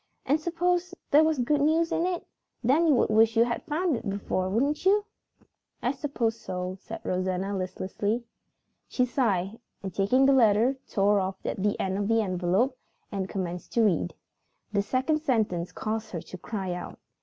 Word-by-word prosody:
And 290 +4 +2
suppose 355 +2 0 0.2
there 300 +2 +7
was 315 -1 +2
good 280 +4 +1
news 325 +3 +2
in 340 - +1
it? 360 -2 -3 0.4
Then 290 +8 +4
you 295 - +5
would 235 - +2
wish 225 +1 +4
you 230 - +7
had 235 0 -2
found 325 0 +1
it - - -5
out - - -3
before, 195 -2 -1
wouldn't 280 +9 0
you?" 405 +2 +4 0.8
"I 245 - +2
suppose 250 -5 -2
so," 180 -1 -4
said - - -8
Rosanna 185 +2 -1
listlessly. 195 +4 -2 0.6
She 250 - +1
sighed 220 -5 0 0.2
and, 190 -2 -5
taking 225 +9 +3
the 275 - +5
letter, 235 +1 +4
tore 200 +1 +3
off 190 0 -2
the 205 +1 -1
end 190 +1 -1
of 200 - -1
the 225 0 +3
envelope 190 +7 0 0.3
and 195 -2 -3
commenced 180 -2 -4
to 230 - +3
read. 165 - +1 0.6
The 200 - +3
second 260 +8 0
sentence 215 - 0
caused 220 0 -3
her 170 - -3
to 185 - -9
cry 190 -4 -4
out. 175 - -7
225 Hz, 180 wpm, -27 LUFS, 190-275 Hz, 0.8 s, there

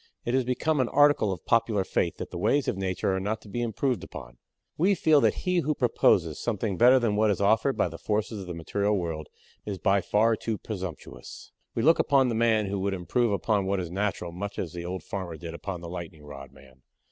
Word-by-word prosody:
It 120 - -1
has 130 0 +3
become 140 +5 0
an 130 - +1
article 145 -7 +4
of 90 - -6
popular 115 -3 +2
faith 85 -2 -1
that - - -7
the - - -5
ways 145 -1 +2
of - - 0
Nature 95 0 -1
are - - -1
not 105 +3 -2
to - - -15
be 110 +4 -4
improved 120 +2 -1
upon. - - -10 0.4
We 190 +5 +3
feel 155 -4 +4
that - - +1
he 180 -1 +2
who 150 -2 0
proposes 90 - +2
something 110 -3 -2
better 125 +7 +6
than 115 -5 +1
what 110 +1 +3
is 100 - 0
offered 110 +7 +2
by - - +2
the 85 -1 -9
forces 105 0 -2
of 95 - -9
the 90 - -5
material 100 +5 0
world 80 -4 -4 0.4
is 100 -2 -4
by 100 0 +2
far 110 +4 +2
too 110 0 -3
presumptious. 95 -7 -8 0.2
We 115 - 0
look 165 +2 +5
upon 135 -3 +3
the - - -1
man 110 -2 +2
who 100 0 -3
would 95 0 -1
improve 105 +7 0
upon 100 -1 0
what 100 0 0
is 85 -2 -5
natural 95 -2 -2
much 100 +4 -6
as 85 -4 -4
the 85 -1 -6
old 90 +1 -5
farmer 90 -5 -5
did 80 +1 -7
upon 90 0 -6
the 85 - -7
lightning 85 -2 -8
rod 70 -2 -10
man. 65 -1 -19
100 Hz, 230 wpm, -27 LUFS, 90-115 Hz, 0.4 s, better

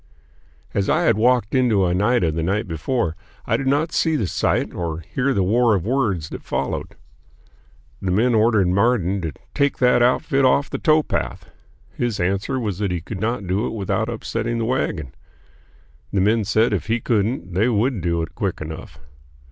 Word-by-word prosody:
As 100 -1 0
I 175 - +2
had - - +4
walked 120 0 +2
into 120 -7 +3
Oneida 90 0 +2
the 80 +1 -2
night 100 +6 -1
before, 85 - -1 0.3
I - - +1
did 135 - -2
not 150 +4 +1
see 160 -2 +1
the 115 - 0
sight - - 0
or 85 -2 -4
hear 125 - -1
the 100 -7 +1
war 115 +3 +3
of 95 - -2
words 110 - 0
that - - -7
followed. 70 - -3 1.1
The 95 - -2
men 115 +7 +2
ordered 110 -3 +3
Marden 100 -1 +1
to 80 -2 -3 0.2
"take 140 -1 +1
that 125 -1 +4
outfit 130 +2 +2
off 135 +2 +3
the - - -3
towpath." 155 -1 0 0.4
His 120 -3 -2
answer 100 +9 0
was 105 -6 -3
that 100 -2 0
he 90 -1 -1
could 95 +4 -7
not 115 -1 -1
do 95 +5 0
it - - -5
without 105 +1 -1
upsetting 115 0 -3
the 115 - -1
wagon. 115 - -2 1.0
The - - +1
men 110 +2 +2
said 110 +3 +2
if 100 - -2
he 115 +2 +1
couldn't 105 -5 -1
they 105 +7 +2
would 115 -1 +1
do 85 0 0
it 80 - -7
quick - - -2
enough. 75 -3 -8
110 Hz, 180 wpm, -21 LUFS, 90-125 Hz, 1.1 s, had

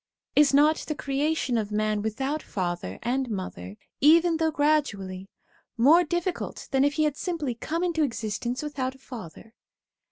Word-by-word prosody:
Is 295 -2 +6
not 295 +3 +5
the 305 - -4
creation 280 -3 0
of 210 -1 -4
man 215 0 0
without 265 +8 -2
father 175 - -4
and 255 +2 -1
mother, 105 - -6 0.2
even 330 +3 +5
though 320 0 +2
gradually, 205 -12 0 0.5
more 300 +9 +6
difficult 345 +2 -3
than 270 -1 +3
if 285 0 +2
he 310 - +1
had 300 -2 +1
simply 325 -8 -2
come 320 +8 -3
into 340 -3 0
existence 240 0 -2
without 270 -3 -3
a - - -16
father 225 -4 -10
270 Hz, 155 wpm, -26 LUFS, 215-310 Hz, 0.5 s, Is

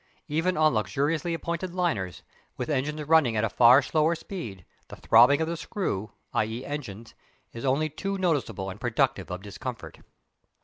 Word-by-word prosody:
Even 165 +4 0
on 155 -1 +4
luxuriously 145 - 0
appointed 170 +2 -4
liners, 110 - -1 0.3
with 125 - -3
engines 150 +2 -1
running 150 -7 +3
at 105 - +1
a 110 - +1
far 125 +3 +7
slower 155 +3 +2
speed, 120 - -8 0.2
the - - -10
throbbing 125 +6 +5
of 160 - 0
the 170 - -2
screw 155 - -3 0.2
(i.e. 110 +4 -1
engines) 115 -7 -7 0.4
is 115 +3 -6
only 140 +4 +2
too 195 +6 -4
noticeable 145 - -1
and 100 - -11
productive 120 -3 0
of 90 +1 -6
discomfort. 105 +2 -7
140 Hz, 160 wpm, -27 LUFS, 110-160 Hz, 0.4 s, far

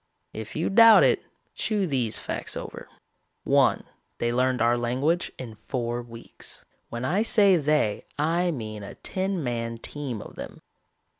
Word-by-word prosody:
If 110 0 -7
you 160 - -1
doubt 230 +1 +8
it, - - +3 0.3
chew 210 -3 0
these 130 -9 0
facts - - -4
over. - - -8 0.5
"One, - - +3 0.3
they 120 0 0
learned 130 0 +1
our 120 +1 +3
language 130 +9 0
in 120 -4 -7
four 120 +2 -3
weeks. 115 -1 -10 0.2
When 120 +2 -4
I 180 +10 +1
say 210 -4 +5
they, 150 -9 +1
I 170 +4 +1
mean 110 -8 -5
a 100 - -9
ten 190 -3 -2
man 115 -2 -3
team 130 -1 -4
of - - -10
them. - - -9
130 Hz, 150 wpm, -26 LUFS, 115-170 Hz, 0.5 s, doubt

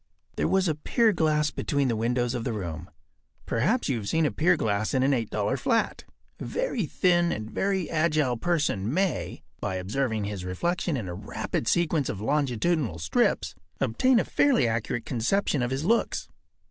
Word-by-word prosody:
There - - 0
was 190 -1 +2
a 160 - +2
pier 220 - +2
glass 155 -3 +1
between 140 -2 0
the 120 - 0
windows 120 +2 0
of 120 -2 -3
the 120 - -2
room. 85 -4 -5 0.6
Perhaps 185 - +1
you 135 - 0
have 105 -3 -4
seen 160 -1 +2
a - - +1
pier 170 +2 +3
glass 110 0 0
in 130 - +3
an 135 - +3
$8 115 -1 -1
flat. 230 - 0 0.3
A - - -5
very 370 - -2
thin 175 0 +2
and 110 +1 -4
very 190 -3 0
agile 155 -5 +1
person 135 - 0
may, 185 +2 -1 0.2
by 95 - -2
observing 110 +4 -1
his 100 -2 -4
reflection 165 - -1
in 110 -6 -4
a 90 - -4
rapid 105 +4 -4
sequence 160 -3 +1
of 100 - -4
longitudinal 140 - 0
strips, 80 -1 +1 0.3
obtain 245 - +3
a - - +2
fairly 270 - +3
accurate 115 +1 -2
conception 135 - 0
of 120 - 0
his 135 +4 -2
looks. 230 +5 +1
135 Hz, 175 wpm, -27 LUFS, 110-170 Hz, 0.6 s, pier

